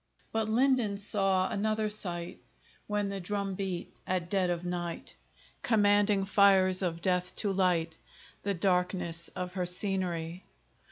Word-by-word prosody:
But 220 -1 0
Linden 240 -3 +2
saw 195 -2 +1
another 215 +1 0
sight, 175 -4 -4 0.5
When 205 -1 0
the 195 0 -4
drum 200 +1 -2
beat, 185 -2 -4
at 180 -2 -1
dead 190 -3 +2
of 175 0 -2
night, 175 -1 -4 0.5
Commanding 205 -2 +3
fires 195 -2 +4
of 170 -2 -2
death 180 -1 0
to 200 -2 -1
light 170 -4 +1 0.4
The 200 -1 -1
darkness 180 -2 0
of 180 0 -4
her 180 -2 -1
scenery. 180 -2 -2
190 Hz, 130 wpm, -30 LUFS, 180-205 Hz, 0.5 s, fires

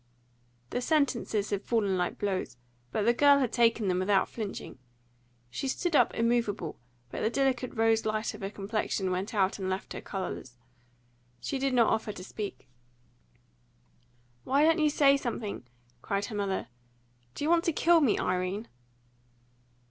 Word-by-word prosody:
The 245 - -1
sentences 245 -8 +1
had 200 -1 0
fallen 210 -4 +1
like 180 -1 -1
blows. 190 - -2 0.3
But 210 - 0
the 235 +3 +4
girl 285 +3 +6
had 255 -5 0
taken 230 -3 +3
them 180 -1 +1
without 195 +1 +2
flinching. 210 - -6 0.7
She 270 - -3
stood 340 +5 -1
up 245 - +4
immovable, 230 -7 0 0.3
but - - -4
the 220 - +2
delicate 260 -1 0
rose 225 0 +3
light 215 0 -1
of - - -10
her 195 - -3
complexion 200 -2 -2
went 190 +5 -3
out 195 0 +1
and 190 -1 -2
left 190 +1 -3
her - - -6
colourless. 160 - -6 0.8
She 275 - -3
did 270 -1 0
not 235 -3 +4
offer 220 -1 -2
to 180 - -9
speak. 205 -3 -6 1.8
"Why 280 +3 +3
don't 325 +1 +4
you 305 -1 +4
say 280 -1 +5
something?" 220 - -4 0.3
cried 200 0 -1
her 215 - -7
mother. 200 -2 -2 0.7
"Do - - -4
you 310 - +2
want 340 -1 +4
to 335 - +3
kill 335 +1 +4
me, 260 -8 +3
Irene?" 185 +4 -1
220 Hz, 160 wpm, -29 LUFS, 195-260 Hz, 1.8 s, girl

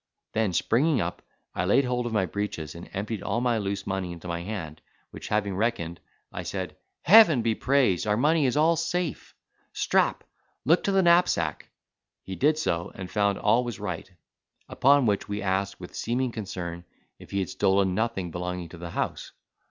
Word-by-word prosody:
Then, 110 -3 +1
springing 130 - +2
up, 85 -2 -3 0.3
I - - -1
laid 130 +8 +3
hold 125 -1 -1
of - - -4
my 105 -4 +1
breeches, 90 -6 -4
and 85 +1 -10
emptied 105 +2 -4
all - - -1
my 120 -2 +1
loose 100 -1 -3
money 95 -2 -3
into 85 +1 -9
my 85 0 -3
hand; 85 -6 -6 0.3
which - - -8
having 100 -2 0
reckoned, 90 -6 -1 0.3
I - - -5
said, - - -5 0.3
"Heaven 170 - +7
be 115 -1 +2
praised, 125 -7 +2
our 105 0 +2
money 150 +3 +3
is 125 - 0
all 160 +2 +4
safe! 170 0 -3 0.4
Strap, - - +1 0.4
look 165 +6 +4
to 200 - +2
the 195 -1 +3
knapsack." 170 - +2 0.5
He 95 - -6
did 150 +6 +2
so, 85 - -1
and 95 -1 -7
found 100 -2 +1
all 125 +2 +3
was 120 -4 -5
right. 95 -5 -5 0.6
Upon 140 0 +4
which 100 -3 0
we 105 +1 -3
asked, 100 +1 -1
with 90 - -10
seeming 125 +2 -1
concern, 90 -6 -6 0.4
if - - -14
he 100 - -3
had 95 -2 -1
stolen 95 -1 +2
nothing 105 -4 -2
belonging 90 0 -4
to 85 - -11
the 85 0 -6
house. - - -4
105 Hz, 185 wpm, -26 LUFS, 90-125 Hz, 0.6 s, Heaven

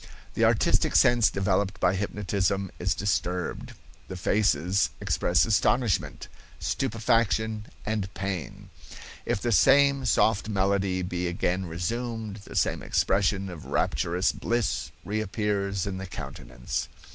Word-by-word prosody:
The - - +2
artistic - - +2
sense 120 -3 +5
developed 95 0 0
by 90 - +3
hypnotism 100 -1 -1
is 90 - 0
disturbed; 90 -3 -2 0.3
the 95 - -6
faces 95 -1 +2
express - - +2
astonishment, 110 +1 +1 0.3
stupefaction 110 -2 0 0.2
and 105 -3 -2
pain. 95 -7 -5 0.6
If - - 0
the 120 - 0
same 140 +4 +5
soft 110 -3 +2
melody 95 -2 0
be 90 0 -2
again 90 +1 -1
resumed, 110 +5 -4
the 100 - -12
same - - +1
expression 95 0 +1
of 85 -5 -9
rapturous 90 +3 0
bliss 120 -2 -1 0.2
reappears 100 -2 -1
in 95 -2 -4
the 95 - -6
countenance. 65 -7 -5
100 Hz, 115 wpm, -27 LUFS, 90-110 Hz, 0.6 s, sense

